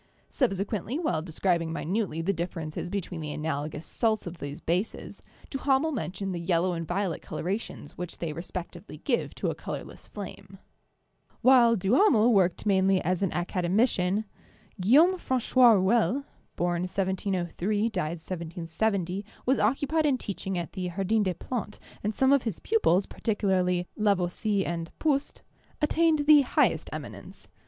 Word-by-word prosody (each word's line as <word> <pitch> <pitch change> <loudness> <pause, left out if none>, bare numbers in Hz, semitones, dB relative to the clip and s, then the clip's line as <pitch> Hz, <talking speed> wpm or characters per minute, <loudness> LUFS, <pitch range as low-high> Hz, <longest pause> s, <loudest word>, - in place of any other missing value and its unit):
Subsequently, 210 - -1
while 300 - 0
describing 165 0 0
minutely 165 0 -2
the 200 +4 +1
differ 175 0 -4
ences 155 +2 -5
between 180 -3 -4
the 150 -1 -4
analogous 150 0 -3
salts 220 -2 0
of 175 -1 -7
these 145 +1 -6
bases, 180 +6 -3 0.3
Duha 270 -1 +2
mel 320 +3 -1
mentioned 195 - -3
the 175 - -3
yellow 175 +1 +1
and 165 -1 -4
violet 180 0 -1
colorations 185 -5 -4
which 180 -1 -6
they 165 -3 -3
respectively 175 +1 -7
give 240 - -1
to - - -1
a - - -3
colorless - - -8
flame. - - -9 0.8
While 245 -3 +6
Duhamel 235 - +4
worked 185 -2 +2
mainly 190 -1 +3
as 185 +1 0
an 195 - +1
academician, 185 +3 +1 0.6
Guil 270 - +7
laume 370 0 -2
Francois 255 -3 +4
Rouelle 230 +7 +2 0.3
(born 175 0 0
1703, 190 +2 -1
died 175 -5 -2
1770) 175 +3 -2 0.2
was 265 +2 +2
occu 275 +2 +1
pied 315 +1 +2
in 270 -3 +2
teaching 195 -4 -4
at 170 -3 -4
the 185 -2 -3
Jardin 195 +5 0
des 185 -3 0
Plantes, 215 +2 -5 0.2
and 210 +1 -1
some 265 +1 +4
of 280 - +4
his 225 -8 -3
pupils, 200 - +2
particularly 185 -5 0
Lavoisier 200 0 +1
and 165 -1 -3
Proust, 285 -3 -1 0.4
attained 310 -1 +2
the 300 -1 +8
highest 260 - +1
eminence. - - -8
195 Hz, 145 wpm, -28 LUFS, 175-230 Hz, 0.8 s, the